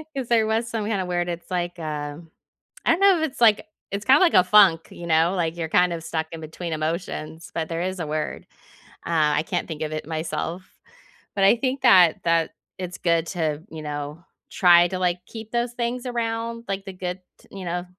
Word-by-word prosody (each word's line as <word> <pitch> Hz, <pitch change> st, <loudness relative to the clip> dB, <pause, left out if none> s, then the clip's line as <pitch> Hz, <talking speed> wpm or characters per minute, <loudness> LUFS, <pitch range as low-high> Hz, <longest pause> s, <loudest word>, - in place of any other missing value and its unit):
'cause 265 Hz, -3 st, -3 dB
there 225 Hz, -2 st, +4 dB
was 225 Hz, +1 st, 0 dB
some 225 Hz, -2 st, -3 dB
kinda 200 Hz, -4 st, -1 dB
word, 175 Hz, -1 st, -1 dB
it's 170 Hz, +1 st, -6 dB
like, 175 Hz, 0 st, -2 dB
uh 150 Hz, -2 st, -4 dB, 0.7 s
I -, -, +4 dB
don't 335 Hz, -, +2 dB
know 390 Hz, -4 st, +5 dB
if 315 Hz, -, +1 dB
it's 260 Hz, -, -14 dB
like 220 Hz, -3 st, +5 dB, 0.3 s
it's 200 Hz, +1 st, -4 dB
kinda 270 Hz, +3 st, +6 dB
like 355 Hz, -3 st, +4 dB
a 180 Hz, -, +7 dB
funk, 185 Hz, -4 st, +5 dB
you 170 Hz, -, -8 dB
know? 165 Hz, +2 st, +3 dB
Like, 165 Hz, -1 st, -1 dB
you're 165 Hz, -1 st, -2 dB
kind 180 Hz, +1 st, +3 dB
of 165 Hz, -, -6 dB
stuck 160 Hz, -1 st, -3 dB
in 165 Hz, -, -7 dB
between 160 Hz, +1 st, -6 dB
emotions, 160 Hz, 0 st, -4 dB
but 160 Hz, -1 st, -2 dB
there 165 Hz, 0 st, -2 dB
is 185 Hz, 0 st, -3 dB
a 160 Hz, -, -2 dB
word. 155 Hz, 0 st, -3 dB, 0.6 s
Uh, 155 Hz, -3 st, +2 dB
I 155 Hz, -, -1 dB
can't -, -, -3 dB
think 160 Hz, -2 st, -6 dB
of 155 Hz, -, -4 dB
it 155 Hz, -, -5 dB
myself. 160 Hz, +2 st, -3 dB, 0.7 s
But 195 Hz, -, +1 dB
I 200 Hz, +5 st, +6 dB
think 260 Hz, +2 st, -2 dB
that 185 Hz, -9 st, +6 dB
that 165 Hz, -1 st, +2 dB, 0.3 s
it's 180 Hz, -1 st, -5 dB
good 170 Hz, -1 st, +1 dB
to, 160 Hz, -4 st, -2 dB
you 160 Hz, -1 st, -8 dB
know, 150 Hz, +2 st, -5 dB, 0.3 s
try 175 Hz, -1 st, +6 dB
to, 185 Hz, -, -3 dB
like, 180 Hz, -1 st, +1 dB
keep 220 Hz, -1 st, -9 dB
those 240 Hz, 0 st, -1 dB
things 240 Hz, +1 st, -3 dB
around, 230 Hz, -1 st, -3 dB
like, 195 Hz, 0 st, -3 dB
good 185 Hz, -1 st, -5 dB, 0.2 s
t -, -, -22 dB
you 195 Hz, -2 st, -8 dB
know, 175 Hz, +1 st, -3 dB
175 Hz, 215 wpm, -24 LUFS, 160-220 Hz, 0.7 s, a